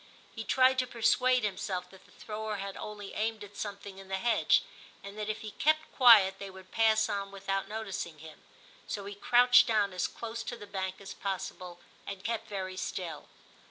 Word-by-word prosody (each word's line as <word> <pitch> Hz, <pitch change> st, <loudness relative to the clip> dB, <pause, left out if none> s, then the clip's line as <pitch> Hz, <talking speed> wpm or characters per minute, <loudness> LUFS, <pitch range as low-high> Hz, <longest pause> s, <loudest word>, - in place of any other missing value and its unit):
He 225 Hz, -, -5 dB
tried 260 Hz, +5 st, +4 dB
to 255 Hz, -, +1 dB
persuade 250 Hz, +1 st, +3 dB
himself 190 Hz, -2 st, -2 dB
that 190 Hz, -, -17 dB
the -, -, -22 dB
thrower 215 Hz, 0 st, -5 dB
had 195 Hz, -1 st, -5 dB
only 205 Hz, -2 st, -7 dB
aimed 220 Hz, 0 st, -2 dB
at 205 Hz, 0 st, -12 dB
something 200 Hz, -2 st, -6 dB
in 195 Hz, -, -12 dB
the 190 Hz, 0 st, -2 dB
hedge, 235 Hz, +4 st, +3 dB, 0.4 s
and 200 Hz, +1 st, -9 dB
that 215 Hz, 0 st, -4 dB
if 215 Hz, -, -3 dB
he 215 Hz, -, -6 dB
kept 310 Hz, +5 st, +1 dB
quiet 210 Hz, -7 st, +7 dB
they 200 Hz, -, -6 dB
would 190 Hz, 0 st, -13 dB
pass 220 Hz, -1 st, +3 dB
on 200 Hz, -1 st, -3 dB
without 195 Hz, 0 st, -3 dB
noticing 200 Hz, -7 st, -5 dB
him; 155 Hz, 0 st, -12 dB, 0.5 s
so 200 Hz, -2 st, -4 dB
he 200 Hz, -, -6 dB
crouched 245 Hz, +4 st, +6 dB
down 210 Hz, -4 st, +2 dB
as 180 Hz, -, 0 dB
close 230 Hz, 0 st, -6 dB
to 240 Hz, -, -5 dB
the 205 Hz, -, -9 dB
bank 190 Hz, -2 st, -4 dB
as 200 Hz, -1 st, -8 dB
possible, 180 Hz, -2 st, -5 dB, 0.3 s
and 195 Hz, -1 st, -6 dB
kept 225 Hz, 0 st, -2 dB
very 190 Hz, -3 st, -5 dB
still. 175 Hz, -5 st, -5 dB
205 Hz, 195 wpm, -31 LUFS, 190-225 Hz, 0.5 s, quiet